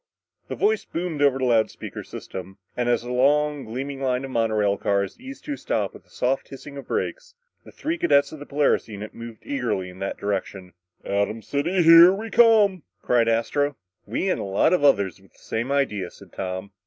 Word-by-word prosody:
The - - -4
voice 435 +2 +1
boomed 165 -3 -4
over 140 -2 +4
the 130 - -1
loud 115 -3 +3
speaker - - -8
system; 95 0 -8 0.2
and 120 0 0
as 120 -1 +1
the 120 - -6
long, 145 +3 +2
gleaming 135 +4 -5
line 130 0 0
of 135 - -8
monorail 110 -4 +1
cars 100 -1 -1
eased 270 +1 -10
to 295 - -3
a - - -6
stop - - -1
with - - -15
a - - -30
soft 130 +2 -1
hissing 140 +1 -10
of 140 - -9
brakes, - - -3 0.3
the - - -13
three 330 +2 -3
cadets 140 - +3
of 155 - -9
the 145 - -10
Polaris 145 0 +1
unit 105 -1 -8
moved 115 -1 -10
eagerly 95 - -2
in 90 - -14
that 95 - -3
direction. 95 -2 -4 0.3
"Atom 100 +2 -1
City, 170 +6 0
here 165 +2 +9
we 215 +3 -4
come," 215 -6 +5 0.2
cried 120 -2 +3
Astro. 140 +5 0 0.3
"We 115 - -2
and - - -1
a - - -3
lot 100 - +2
of 180 - +2
others 100 - +3
with 95 - -23
the - - -27
same 115 +4 -3
idea," 105 -10 0
said - - -17
Tom. 95 +1 -5
130 Hz, 205 wpm, -24 LUFS, 105-160 Hz, 0.3 s, here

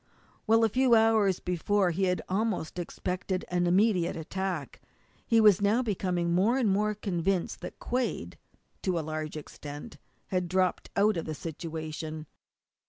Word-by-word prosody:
While 225 +1 +5
a 225 - +4
few 255 +1 +4
hours 220 -4 +4
before 180 +2 +1
he 190 +3 0
had 180 -1 0
almost 195 -4 -1
expected 185 +1 -3
an 175 0 +1
immediate 185 -1 +3
attack, 175 -2 -4 0.5
he 230 -2 +4
was 210 -3 +6
now 215 +5 +3
becoming 180 -5 -1
more 205 +8 +3
and 240 -6 +2
more 210 +2 +1
convinced 185 -2 -1
that - - -7
Quade, 235 - -3 0.4
to 185 -2 0
a 160 - -2
large 155 0 -4
extent, 145 +5 -9 0.3
had 180 -3 -1
dropped 185 0 0
out 205 -1 +4
of 165 - -3
the 155 - -4
situation. 155 -1 -6
185 Hz, 150 wpm, -29 LUFS, 170-210 Hz, 0.5 s, was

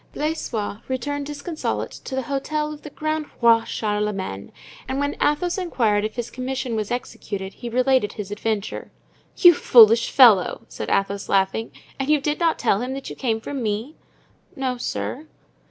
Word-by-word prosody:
Blaisois 245 -9 -3
returned 285 +3 -3
disconsolate 295 +2 -3
to 265 - -7
the 265 - -1
Hotel 300 +4 -2
of 295 - -11
the 300 - -9
Grand 310 +1 -3
Roi 230 -1 +5
Charlemagne 210 - -3 0.4
and 265 +1 -1
when 285 0 -1
Athos 350 +5 +1
inquired 225 - +1
if 215 0 -3
his 240 -1 -4
commission 255 -1 -3
was 215 -2 -2
executed, 200 -5 -5
he 240 - -7
related 255 -3 +2
his 205 -2 -7
adventure. 210 0 -3 0.5
"You 350 -2 +8
foolish 230 -5 +6
fellow!" 225 -9 +5
said - - -6
Athos, 195 0 0
laughing. 195 +3 +1 0.3
"And 270 +1 -2
you 305 -1 +4
did 295 +2 -2
not 335 -2 +2
tell 200 - +1
him 255 +2 -3
that 275 - -7
you - - -7
came 225 -4 -1
from 270 +4 -5
me?" 225 +7 -3 0.6
"No, 260 -3 -2
sir." 280 +4 -4
250 Hz, 165 wpm, -23 LUFS, 215-290 Hz, 0.6 s, You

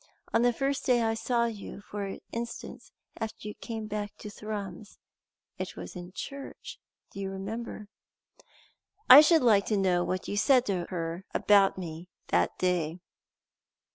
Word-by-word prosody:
On 225 - +4
the 245 0 +4
first 275 +3 -1
day 245 -2 +4
I 225 0 +1
saw 235 +1 +1
you, 215 -3 -6
for 200 -1 -5
instance, 235 0 -6 0.3
after 220 -1 -5
you 210 - -5
came 225 -1 -6
back 210 -1 -4
to 210 - -8
Thrums. 205 -2 -7 0.6
It - - -4
was - - -8
in 180 0 -8
church. 275 +8 -8 0.3
Do - - -9
you 195 -1 -3
remember?" 210 +2 -6 1.2
"I 275 +3 +13
should 315 -1 +5
like 210 -5 +4
to 215 - +1
know 180 -2 +2
what 185 0 -3
you 205 - -3
said 255 +3 +4
to 185 -4 -1
her 170 0 -4
about 200 -2 +5
me 170 -1 -7 0.2
that - - +2
day." 175 -3 0
205 Hz, 155 wpm, -29 LUFS, 185-230 Hz, 1.2 s, I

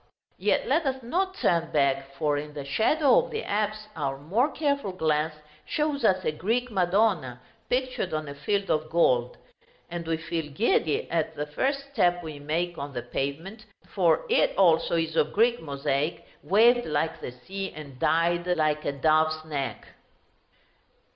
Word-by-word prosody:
Yet - - +1
let 330 - +2
us 265 -1 -2
not 375 +10 -1
turn 170 - +1
back, 140 -1 +1
for 150 +1 0
in 150 +1 -5
the 140 -2 -5
shadow 280 - +3
of - - -8
the 445 - -4
apse 215 +1 -2
our 140 -4 -2
more 200 - +1
careful 280 -10 -1
glance 155 -2 0 0.3
shows 300 -3 -1
us 185 -4 +3
a - - +2
Greek 230 +10 -1
Madonna, 180 - +1 0.3
pictured 255 -7 -1
on 155 -1 -3
a 140 - -6
field 195 +8 -1
of 155 0 0
gold; 125 -7 +2 0.5
and 170 -1 -5
we 165 -1 0
feel 160 -1 -4
giddy 155 -3 +1
at 160 -1 -1
the 150 - -3
first 275 - -2
step 175 -7 +2
we 155 -3 -7
make 165 +4 -2
on 140 0 -6
the 120 - -4
pavement, 165 - -5 0.2
for 170 -5 +2
it, - - +2
also, 170 -3 +4
is 165 -1 -1
of 155 -1 +1
Greek 235 +3 +3
mosaic 140 +1 -2 0.2
waved 235 +5 +4
like 160 +1 -1
the - - -5
sea, 190 +10 -6
and 140 -4 -11
dyed 170 +3 +2
like 155 -4 +1
a - - +1
dove's 155 +2 +2
neck. 145 -4 -4
165 Hz, 165 wpm, -27 LUFS, 150-215 Hz, 0.5 s, also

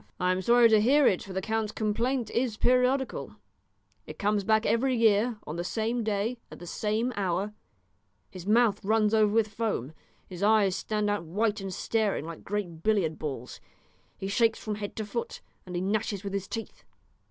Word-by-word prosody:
"I 180 0 +2
am 185 0 0
sorry 235 +3 +6
to 215 -1 +5
hear 275 +6 +4
it, 185 - +3
for 195 - -9
the 190 0 -2
count's 220 0 -1
complaint 230 +3 -1
is 235 -3 0
periodical; 255 +2 +1 0.7
it - - -9
comes 205 0 +1
back 220 +1 +2
every 250 +4 +2
year, 225 0 +3
on 155 - -5
the 175 - -2
same 225 +5 -1
day, 220 +3 -1
at - - -10
the 175 - -10
same 220 +7 -1
hour; 195 +1 -1 0.8
his 185 -1 -9
mouth 215 -1 +3
runs 215 +1 +2
over 215 -2 +4
with 220 0 +2
foam, 200 - -2 0.3
his 180 -1 -9
eyes 205 -3 +4
stand 210 -1 -1
out 205 -3 0
white 210 +5 0
and 195 -1 -5
staring, 210 -3 -1
like 165 -1 -8
great 180 -5 -4
billiard 190 -6 +1
balls; 135 -5 -5 0.6
he 195 - -4
shakes 225 +2 +2
from 215 - -4
head 205 -1 -5
to 215 - -3
foot, 235 +3 -4 0.3
and 180 - -6
he 175 - -1
gnashes 200 0 -1
with 200 -1 -5
his 200 -1 -2
teeth." 225 -1 -7
210 Hz, 185 wpm, -28 LUFS, 195-225 Hz, 0.8 s, sorry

